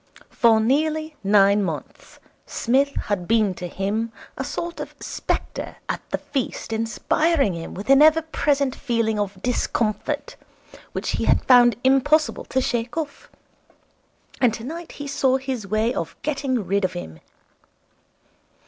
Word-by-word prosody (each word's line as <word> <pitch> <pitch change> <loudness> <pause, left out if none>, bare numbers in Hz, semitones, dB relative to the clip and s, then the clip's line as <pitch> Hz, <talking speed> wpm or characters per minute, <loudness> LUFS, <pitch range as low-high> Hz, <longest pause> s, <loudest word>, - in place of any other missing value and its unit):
For 230 -2 +4
nearly 310 +6 0
nine 200 0 +5
months 160 -5 -6 0.3
Psmith 275 +4 +1
had 185 -4 -2
been 215 -3 +3
to 180 0 -6
him 205 +6 -2 0.2
a 270 - -3
sort 340 +5 -5
of - - -7
spectre - - -4
at - - -2
the - - -1
feast 260 -4 -4
inspiring 230 - +1
him 165 -1 -7
with 200 +3 -7
an 275 +1 +7
ever 315 +1 +6
present 285 -4 0
feeling 230 -4 0
of 200 -2 -3
discomfort 240 - -1 0.6
which - - -2
he - - -1
had - - +3
found 245 -2 +6
impossible 280 +4 +3
to 260 - 0
shake 240 +1 -2
off. 300 -3 -5 1.1
And 245 -3 +4
tonight 310 +10 -7
he 290 - -7
saw 265 -2 +2
his 260 -6 -4
way 215 +4 +1
of 165 - -4
getting 270 -7 -1
rid 200 +1 0
of 185 0 0
him. 80 - -7
240 Hz, 140 wpm, -23 LUFS, 210-280 Hz, 1.1 s, an